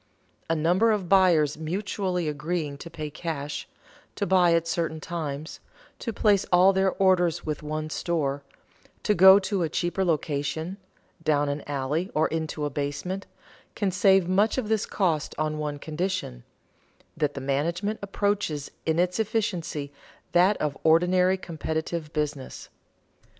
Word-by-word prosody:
A 165 - +2
number 180 +8 +3
of 205 -4 -1
buyers 170 -6 +4
mutually 180 +1 -2
agreeing 150 0 -2
to 170 - -8
pay 155 -2 -6
cash, 150 -2 -4 0.5
to 200 - -1
buy 180 -2 +4
at 165 0 0
certain 165 -1 -1
times, 155 -2 -5 0.4
to 230 - -3
place 205 -2 +3
all 180 +2 +6
their 190 0 +2
orders 180 -3 +2
with 150 -1 -3
one 155 +1 -3
store, 145 -6 -1 0.6
to 210 - +3
go 190 +1 +9
to 200 -1 -1
a 165 - 0
cheaper 175 +4 -1
location, 160 +1 -1 0.5
down 145 -2 +2
an 145 +1 -2
alley 145 +6 -1
or 155 - +3
into 160 -2 -3
a 145 - -2
basement, 145 +8 -3 0.5
can 200 -3 0
save 190 0 +4
much 200 +6 +2
of 235 -5 -2
this 220 -2 +1
cost 165 -7 0
on 155 0 -1
one 150 -1 -3
condition: 160 - -4 0.7
that 150 -2 -1
the - - -3
management 170 +10 -1
approaches 200 -7 -1 0.2
in 160 0 +2
its 180 +2 +1
efficiency 185 -10 -2 0.4
that 185 +4 +4
of 150 -2 -2
ordinary 180 +3 +4
competitive 160 -2 -4
business. 150 -3 -4
170 Hz, 145 wpm, -26 LUFS, 150-190 Hz, 0.7 s, go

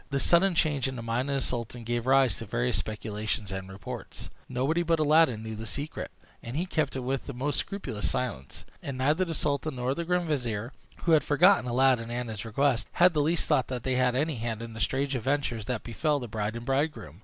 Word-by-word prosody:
This 140 -1 0
sudden 175 +1 +4
change 150 -5 +2
in 130 - -4
the 120 - -6
mind 120 +4 -1
of 140 - 0
the 135 - 0
sultan 120 -1 -4
gave 120 +1 -2
rise 135 -2 +5
to - - -6
various - - 0
speculations 105 -1 -3
and 95 0 -5
reports. 95 -1 -8 0.2
Nobody 135 +7 +1
but 165 -1 +1
Aladdin 150 -7 +4
knew 110 0 -5
the 110 +1 -6
secret, 145 +8 -4 0.3
and 120 +4 -5
he 175 - 0
kept 155 -7 -1
it 130 - -2
with 130 +1 -2
the 140 - -5
most 140 +4 -1
scrupulous 155 - -3
silence; 70 - -4 0.2
and 140 -2 -5
neither 150 +7 +2
the 165 -2 -4
sultan 145 -1 -1
nor 125 +1 0
the 170 - -3
grand 180 0 0
vizier, 120 -5 -2 0.3
who 170 - +2
had 155 -2 +6
forgotten 165 0 +4
Aladdin 125 -2 +3
and 120 -1 -3
his 110 0 -6
request, 125 +2 +1
had 180 0 +5
the 150 - +2
least 165 +3 +1
thought 130 - +2
that 125 -2 -5
he 130 - +1
had 125 -1 +2
any 150 +1 0
hand 115 0 -3
in 115 -1 -7
the 110 - -8
strange 140 +4 0
adventures 130 -3 -1
that 120 -1 -3
befel 145 +6 0
the 120 - -6
bride 105 0 -3
and 115 0 -6
bridegroom. 135 - -1
130 Hz, 225 wpm, -28 LUFS, 115-150 Hz, 0.3 s, had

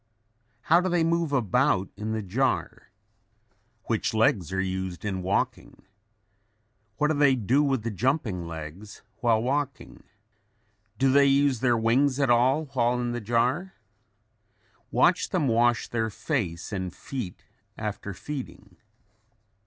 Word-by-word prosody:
How 170 +7 +4
do 185 - -1
they 175 -2 +2
move 165 -1 0
about 125 -5 +1
in 105 +2 -4
the 110 -1 -2
jar? 125 +8 -1 0.9
Which - - -1
legs 100 -6 +2
are 95 - -1
used 95 -1 -3
in 95 -2 -2
walking? 95 +2 -2 1.1
What 150 0 +2
do - - +2
they 145 -2 +4
do 125 +4 +2
with 135 -6 0
the 115 - -2
jumping 105 - -1
legs 85 +5 -9
while 115 -2 +2
walking? 140 -1 -3 1.0
Do 135 +3 +3
they 140 +1 +5
use 140 -2 +3
their 120 -1 +2
wings 130 +5 +2
at 135 -3 +3
all 130 +6 +3
while 125 -1 +1
in 120 -1 -2
the 120 0 -4
jar? 125 - 0 1.1
Watch - - +2
them 145 - 0
wash 120 0 +2
their 115 -1 -1
face 100 - -3
and 95 -2 -3
feet 120 -2 -7 0.3
after 105 -1 -5
feeding. 145 +4 -8
120 Hz, 135 wpm, -26 LUFS, 105-140 Hz, 1.1 s, they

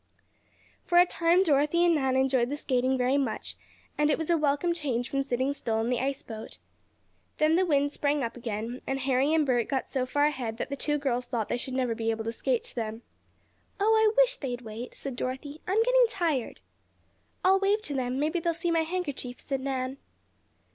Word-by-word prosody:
For 345 - +1
a 355 - +8
time 345 +1 +3
Dorothy 300 +2 +3
and 345 - +4
Nan 265 -4 +1
enjoyed 260 -2 +2
the 290 - -3
skating 260 -2 +1
very 255 +3 +2
much, 275 - -3 0.4
and 300 0 +3
it 295 - +2
was 325 +1 -2
a - - +5
welcome 300 +2 +1
change 260 -7 -2
from 275 - +1
sitting 265 +1 -1
still 230 -5 -2
on 225 +2 0
the 250 - +1
ice 275 +1 -2
boat. 220 -2 -8 0.8
Then 310 +1 +3
the 370 +1 +2
wind 285 -2 +2
sprang 290 -1 0
up 230 0 -3
again, 230 +1 -5
and 270 0 -1
Harry 265 +2 +2
and 315 -1 +3
Bert 245 -4 +1
got 265 -2 -2
so 255 -2 -1
far 290 +2 +2
ahead 250 -7 -2
that - - -4
the 280 - -2
two 295 +2 0
girls 250 -3 -1
thought 230 -4 -2
they - - 0
should 255 +1 -4
never 250 -3 0
be 225 0 -2
able 225 0 -1
to 225 - -2
skate 245 +1 -1
to - - -7
them. 225 0 -4 0.8
"Oh, 430 +3 +4
I 440 -1 +4
wish - - +4
they'd 250 -3 -4
wait," 225 +1 -8
said 270 -3 -5
Dorothy. 265 +5 -5
"I'm 415 +5 +3
getting - - +5
tired." 330 - -1 0.8
"I'll 380 +1 +5
wave 405 +2 +1
to 290 - -2
them 255 -1 -1
maybe 315 +4 0
they'll 335 0 -1
see 340 +1 -1
my 330 -1 +3
handkerchief," 315 -7 -4
said 270 -2 -3
Nan. 260 0 -3
275 Hz, 210 wpm, -28 LUFS, 250-320 Hz, 0.8 s, a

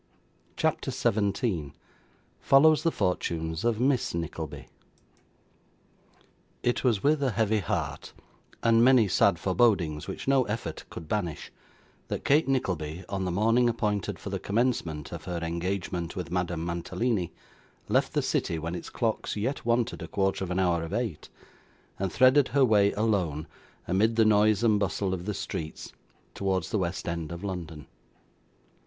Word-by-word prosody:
CHAPTER - - 0
17 100 - 0 0.7
Follows 155 +3 +5
the 165 - +1
Fortunes 80 - -2
of 115 -2 +1
Miss 130 -6 +1
Nickleby 85 -2 -5 2.0
It 120 - +1
was 115 -6 +2
with 150 0 +3
a 135 - +2
heavy 110 -1 +1
heart, 95 - -3 0.5
and 115 0 +5
many 125 -4 +6
sad 90 - +3
forebodings 90 -11 +1
which - - -6
no 135 -1 +4
effort 105 -7 -4
could 80 - -9
banish, 85 -5 -3 0.6
that - - -4
Kate 150 +2 +4
Nickleby, 90 - -1
on 95 -1 -2
the 90 - -1
morning 115 +6 +3
appointed 105 -4 -1
for - - -7
the - - -2
commencement 100 - -1
of 85 -3 -7
her 90 -2 -3
engagement 85 +1 -3
with 90 -3 -5
Madame 90 -2 -1
Mantalini, 90 +3 -1 0.6
left - - +1
the - - +1
city 85 - 0
when 80 +2 -4
its 90 - -6
clocks 115 -3 -2
yet 115 +6 -2
wanted 120 0 +1
a - - -5
quarter 95 -1 0
of 95 - -4
an 90 - -1
hour 90 -3 +2
of 80 +3 -5
eight, 115 -8 -3 0.7
and 95 -2 -1
threaded 130 +4 +5
her 135 +1 +3
way 105 -3 +4
alone, 95 -8 0 0.4
amid 105 +6 +2
the 110 -1 +4
noise 105 0 +4
and 110 -3 +4
bustle 95 -1 -1
of 90 +1 -5
the 105 - -2
streets, 85 -5 -6 0.4
towards 95 -4 -1
the 105 - +1
west 90 0 -3
end 85 -1 -3
of 85 +2 -7
London. 85 -7 -5
100 Hz, 150 wpm, -28 LUFS, 85-115 Hz, 2.0 s, many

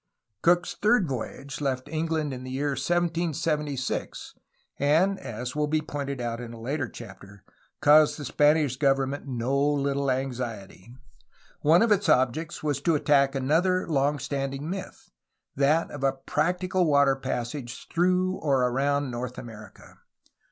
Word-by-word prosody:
Cook's 175 0 +3
third 210 -3 +2
voyage 135 +2 -5
left 130 -1 -2
England 155 -1 -2
in 130 0 -7
the 130 - -7
year 140 +3 -1
1776, 155 -2 -2 0.5
and 165 +8 +3
(as 120 +3 -6
will 150 0 0
be 155 +1 +1
pointed 140 -3 -5
out 120 0 -3
in 120 -1 -8
a 115 - -10
later 135 +2 -3
chapter) 100 -3 -12 0.4
caused 150 +1 +6
the 145 - -6
Span 150 +4 +4
ish 140 -5 -1
government 135 0 0
no 125 +1 -1
little 140 -1 +1
anxiety. 120 -6 -4 0.7
One 165 +7 +5
of 230 - +1
its 200 -3 +2
objects 130 +5 +1
was 145 -3 -1
to 165 +2 +2
attack 140 -2 +3
another 165 +8 +1
long 145 -2 +1
standing 135 +1 -4
myth, 190 +2 -7 0.4
that 145 +4 +2
of 145 -2 -7
a 135 -1 +3
practical 180 +5 0
water 140 -2 +4
passage 125 -1 -5
through 185 +2 +2
or 135 -4 +2
around 140 +2 0
North 125 +1 -5
America. 110 -2 -12
140 Hz, 145 wpm, -26 LUFS, 130-155 Hz, 0.7 s, caused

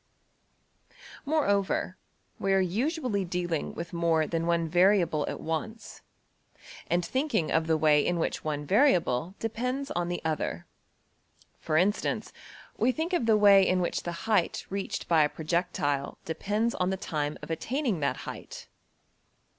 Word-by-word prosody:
Moreover, 200 - +1 0.4
we 195 0 +1
are 195 - +4
usually 220 - 0
dealing 175 -3 -3
with 170 0 -6
more 165 -2 +2
than 165 +1 -2
one 170 -1 +1
variable 175 -3 +3
at - - -5
once, 220 +8 -5 0.9
and 175 0 +1
thinking 265 - 0
of 160 0 +1
the 160 -1 +3
way 150 -1 +4
in 175 - 0
which 165 - -2
one 150 -1 -3
variable 180 - +2
depends 250 +5 -3
on 175 0 -1
the 175 - -2
other: 160 -1 -2 0.9
for 155 - 0
instance, 195 +5 0 0.4
we 240 +3 +3
think 320 +6 -3
of 255 -10 +1
the 220 -1 +5
way 200 -2 +7
in 185 -1 +2
which 175 - -1
the 175 - -4
height 210 -6 +1
reached 200 +1 -3
by 165 -2 +4
a 150 - +3
projectile 155 -4 -1
depends 210 +7 -1
on 180 0 0
the 190 - -1
time 150 -4 -3
of - - -6
attaining 240 - -1
that 140 - 0
height. - - -8
180 Hz, 145 wpm, -28 LUFS, 160-215 Hz, 0.9 s, way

